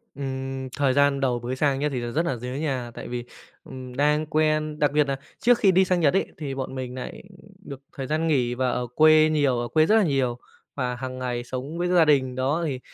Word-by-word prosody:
Ừm, 135 -1 -5
thời 140 -2 +2
gian 140 0 +3
đầu 125 -3 0
bới 120 +2 -4
sang 135 0 +1
nhá, 150 +1 0
thì 135 -3 -3
là 120 0 -4
rất 155 - +1
nà 135 - -1
nhớ 125 +1 -7
nhà 135 -5 -3
tại - - -8
vì, 120 0 -4 0.4
ừm, 130 -1 -9
đang 150 +3 +2
quen 155 0 0
đặc 145 -2 +2
biệt 150 +1 +3
nà 135 - -1 0.2
trước 245 +1 +4
khi 195 - +4
đi 190 +1 +4
sang 180 -1 +1
Nhật 150 -4 +3
ấy, 195 - +2
thì 140 -3 -5
bọn 130 0 -5
mình 125 -1 -5
nại 130 - -7 0.4
được 140 -2 -8
thời 135 -1 -5
gian 155 +3 0
nghỉ 125 -6 +1
và 130 0 0
ở 125 0 -2
quê 155 0 +6
nhiều, 140 -5 +2
ở 120 - -2
quê 155 +5 +3
rất 215 - +3
là 220 - +5
nhiều 135 -6 0 0.4
và 125 -3 -2
hàng 130 +1 -6
ngày 125 -1 -3
sống 130 +6 -6
với 175 +1 0
gia 175 -2 +4
đình, 130 -4 +2
đó, 140 +6 0
thì 135 -4 -3
135 Hz, 245 wpm, -24 LUFS, 130-155 Hz, 0.4 s, quê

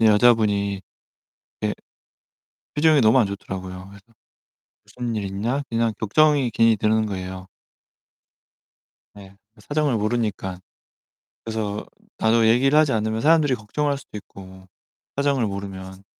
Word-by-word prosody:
여자분이 105 -3 +3 0.8
예 - - 0 1.0
표정이 155 0 +4
너무 110 +2 +5
안 115 - +4
좋더라고요. 95 -2 -7
그래서 100 +1 -15 0.8
'무슨 120 -2 -5
일 105 -2 -2
있나?' 110 +9 -2
그냥 115 -1 0
걱정이 145 +4 +3
괜히 115 0 +3
드는 110 +1 +2
거예요. 95 -1 -6 1.7
네. 100 -1 -13 0.2
그 - - -20
사정을 145 -4 0
모르니까 105 -4 -2 0.9
그래서 110 -2 -4 0.3
나도 110 0 +3
얘기를 135 +6 +4
하지 155 -3 +4
않으면 110 0 -1
사람들이 150 -2 +4
걱정할 140 +6 -2
수도 130 - -10
있고 95 -2 -13 0.5
사정을 140 -3 +1
모르면. 95 -1 -7
110 Hz, 280 characters per minute, -23 LUFS, 100-125 Hz, 1.7 s, 너무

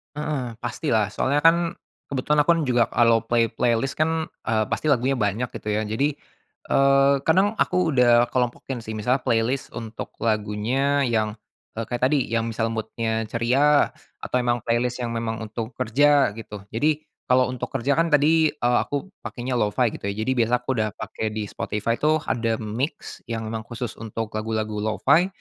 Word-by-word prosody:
Heeh, 145 -6 -3
pastilah 115 -4 0
soalnya 140 +6 0
kan 165 0 +4 0.3
kebetulan 140 +2 0
aku 145 - -8
kan 165 - 0
juga 125 -3 +3
kalau 115 -1 +4
play 115 0 +1
playlist 120 +4 0
kan, 160 0 0 0.2
eee, 110 -3 +2
pasti - - -1
lagunya 135 -1 +2
banyak 110 +3 0
gitu - - -9
ya 105 +1 0
jadi, 135 +8 0 0.6
eee, 135 0 +5
kadang 190 +5 +4
aku 180 -3 +2
udah 120 -2 +4
kelompokin 125 +1 -2
sih 110 -1 -6
misalnya 125 +5 +1
playlist 120 +3 0
untuk 115 -1 -7
lagunya 115 +6 +1
yang, 110 -3 0 0.4
eee, 115 - -2
kayak 120 +2 0
tadi 140 -1 +2
yang 115 0 0
misal 115 0 -1
mood-nya 110 0 -2
ceria 135 +6 +3 0.3
atau - - -3
memang 120 -1 0
playlist 120 +1 0
yang 115 - -2
memang 115 -1 -3
untuk 110 +2 -6
kerja 140 +1 +3
gitu. 105 -2 -9
Jadi 150 +6 0 0.2
kalau 125 0 +3
untuk 125 - -4
kerja 135 +1 -1
kan 165 - +3
tadi, 155 +1 +3
eee, 120 -4 +2
aku 145 +7 -4
pakainya 125 0 -3
lo-fi 110 +3 +1
gitu - - -6
ya 100 - -2
jadi 130 - 0
biasa 115 +1 +2
aku - - -11
udah 110 0 +1
pakai 110 - -4
di 110 - -2
Spotify 105 +3 -3
tuh 155 0 +2
ada 115 -1 0
mix 115 +8 -4
yang 115 -1 -3
memang 110 0 -5
khusus 120 0 -6
untuk 115 -1 -5
lagu-lagu 110 -1 -2
lo-fi 135 - +3
120 Hz, 170 wpm, -24 LUFS, 110-140 Hz, 0.6 s, eee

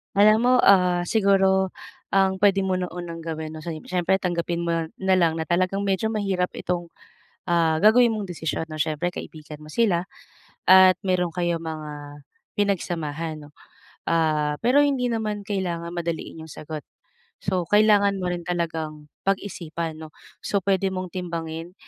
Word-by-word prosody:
Alam 215 +2 +6
mo, 250 - +4
ah, 180 -2 +4
siguro 190 -3 +3 0.4
ang 195 -1 +3
pwede 195 -1 +5
mo 185 - +1
na 180 -1 -3
unang 170 -2 -7
gawin 160 -1 -5 0.3
syempre 185 +1 +1
tanggapin 170 -1 -2
mo 170 -1 0 0.2
nalang 185 -4 +2
na 160 - -3
talagang 185 +3 +1
medyo 195 +3 0
mahirap 195 -4 -1
itong, 175 -1 -4 0.5
ah, 165 -2 +2
gagawin 225 +6 +6
mong 215 -2 -2
desisyon 160 -3 -3
'no 155 -1 -4
syempre 160 +3 -1
kaibigan 155 -2 -9
mo 155 - -12
sila, 180 -1 +1 0.6
at 185 -1 +7
meron 180 -2 +1
kayong 170 -1 -1
mga 155 -2 -6 0.7
pinagsamahan, 165 -6 -2
'no. 145 - -17 0.6
Ah, 155 -3 +1
pero 255 +5 +4
hindi 275 -3 +1
naman 215 -3 -3
kailangan 175 -5 -3
madaliin 170 -1 -4
yung - - -14
sagot. 155 +1 -7 0.6
So, 180 -1 0
kailangan 205 -1 +4
mo 180 - -1
rin 175 - -4
talagang 160 -3 -3 0.2
pag-isipan 170 -5 -3
'no. 155 - -8 0.3
So 200 - -1
pwede 195 -1 +2
mong 185 -2 -5
timbangin 165 -1 -5
175 Hz, 145 wpm, -24 LUFS, 165-195 Hz, 0.7 s, at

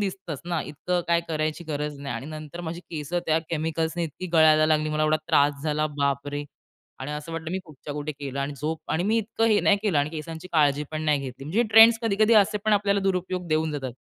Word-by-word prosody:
दिसतंच 190 -7 -4
ना, 170 -2 0
इतकं 175 +4 -2
काय 170 0 +3
करायची 155 +1 -2
गरज 150 -1 -4
नाही 140 -4 -4
आणि 130 +5 -6
नंतर 155 +2 -8
माझी 170 +1 -5
केसं 155 +2 -3
त्या 160 0 +3
केमिकल्सने 160 +1 -1
इतकी 165 +4 -6
गळायला 155 -1 +6
लागली 155 0 +2
मला 155 0 0
एवढा 155 0 +3
त्रास 145 0 +3
झाला 155 0 0
बाप 140 0 0
रे! 145 0 -4 0.5
आणि 135 +3 -5
असं 150 +2 -6
वाटलं 165 0 -5
मी 185 - -1
कुठच्या 150 -1 -9
कुठे 150 +1 -4
केलं 140 -1 -5
आणि 140 +1 -2
झोप 160 +1 -2
आणि 160 - +1
मी 220 +3 +2
इतकं 225 +1 -1
हे 210 -2 +4
नाही 205 - +4
केलं 195 -9 +2
आणि 145 +1 0
केसांची 160 +2 -7
काळजी 150 -2 +3
पण 155 0 -4
नाही 150 -2 +2
घेतली. 135 0 -7
म्हणजे 195 +11 +1
ट्रेंड्स 225 +1 +8
कधी 220 -3 0
कधी 220 +2 +5
असे 210 0 +4
पण 215 - +2
आपल्याला 200 -1 +2
दुरुपयोग 185 -1 -1
देऊन 155 0 +1
जातात. 135 -4 -4
155 Hz, 225 wpm, -25 LUFS, 150-180 Hz, 0.5 s, ट्रेंड्स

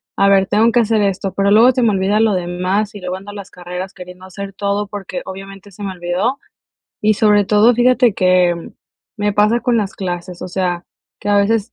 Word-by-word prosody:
"A 200 - +3
ver, 195 -1 +4
tengo 215 +4 +2
que 240 +1 +3
hacer 220 -1 +1
esto", 195 -1 -1
pero 200 0 +1
luego 230 +5 +6
se 255 0 -1
me 230 - +3
olvida 195 +2 +1
lo 220 -1 +3
demás, 185 +4 -2
y - - -7
luego 180 0 -4
ando 195 +2 -9
a - - -12
las 200 -2 -9
carreras 180 +2 -7
queriendo 180 -1 -12
hacer 195 +1 -8
todo 200 +1 -2
porque, 195 -3 -6
obviamente, 195 +1 -10
se 205 +2 -10
me 195 - -3
olvidó. 180 +9 -2 0.6
Y, 215 0 +3
sobre 210 -1 +3
todo, 215 +4 +4
fíjate 245 -1 +3
que 185 -2 +3 0.6
me 205 0 0
pasa 210 +4 +2
con 240 +1 +1
las 200 -3 -3
clases, 180 -1 -5
o - - -5
sea, 180 -1 -2 0.3
que 205 - -3
a 205 - +3
veces 210 +2 0
200 Hz, 215 wpm, -17 LUFS, 185-210 Hz, 0.6 s, luego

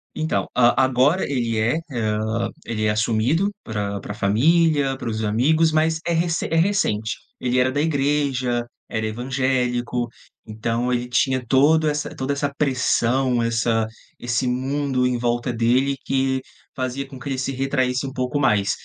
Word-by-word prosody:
Então, 155 +1 -1
hã, 120 -1 +5
agora 130 +7 +3
ele 115 -4 0
é, 115 +8 +1
hã, 110 -1 -1 0.2
ele 110 -2 -2
é - - +3
assumido 115 - +1
pra 100 -2 -3
pra 100 - -7
família, 140 +6 +2
para - - -6
os 110 0 -3
amigos, 150 +10 +3
mas 160 +1 +2
é - - +1
recen 165 0 0
é - - +1
recente. 165 - +1 0.2
Ele 125 0 +1
era 130 +1 +3
da 145 - -1
igreja, 140 -5 0 0.2
era 110 0 -2
evangélico, 125 0 -1 0.4
então 115 +3 -2
ele 125 0 -1
tinha 130 +1 +1
todo 150 +6 +4
essa 150 0 -1
toda 135 +2 -2
essa 140 0 -1
pressão, 125 -2 +1
essa 115 -1 +1 0.3
esse 120 +1 -1
mundo 130 +1 0
em 125 -1 +1
volta 120 +1 -1
dele, 125 +4 +2
que 130 0 0 0.3
fazia 130 +1 -3
com 135 -1 -11
que 140 - -6
ele 135 - -2
se 130 +1 -2
retraísse 130 -1 0
um 135 - -7
pouco 130 +2 -1
mais. 105 -7 +2
130 Hz, 160 wpm, -22 LUFS, 115-140 Hz, 0.4 s, hã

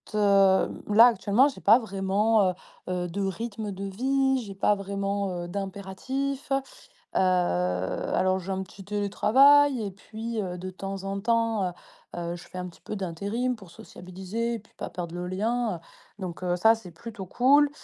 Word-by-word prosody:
heu, 195 -2 +4 0.2
là, 225 +4 +8
actuellement, 235 +4 +3
j'ai - - -10
pas 220 +5 +6
vraiment, 200 -1 +2
heu - - -7 0.4
heu, 180 -1 -1
de 200 +4 -3
rythme 210 +2 -4
de 195 0 -6
vie. 265 +6 +1
J'ai 195 -2 -9
pas 205 +2 +3
vraiment, 200 0 -2
heu, - - -6
d'impératif, 200 +9 -4
heu, 270 - +4 0.6
alors, 175 - +1
j'ai 185 +2 -7
un 190 - -2
petit 195 +1 -13
télétravail 250 +7 +4
et - - -4
puis, 220 +3 -5
heu, 180 -2 -5
de 185 +1 -5
temps 195 +1 -6
en 195 0 -3
temps, 225 -3 +1
heu - - -6 0.4
heu, 170 0 -3
je 175 - -11
fais 185 - -8
un 180 - -4
petit 165 - -16
peu 195 +4 -6
d'intérim 200 +7 -2
pour 195 -7 -14
sociabiliser 190 +7 -5
puis 210 - -21
pas - - -6
perdre 175 -1 -6
le 180 0 -4
lien, 220 +2 -1
heu, - - -10 0.4
donc 180 -2 -6
heu, 180 -1 0
ça, 225 +5 +5
c'est 220 -5 -10
plutôt 200 +4 -8
cool, 280 +9 +4
200 Hz, 175 wpm, -27 LUFS, 185-230 Hz, 0.6 s, là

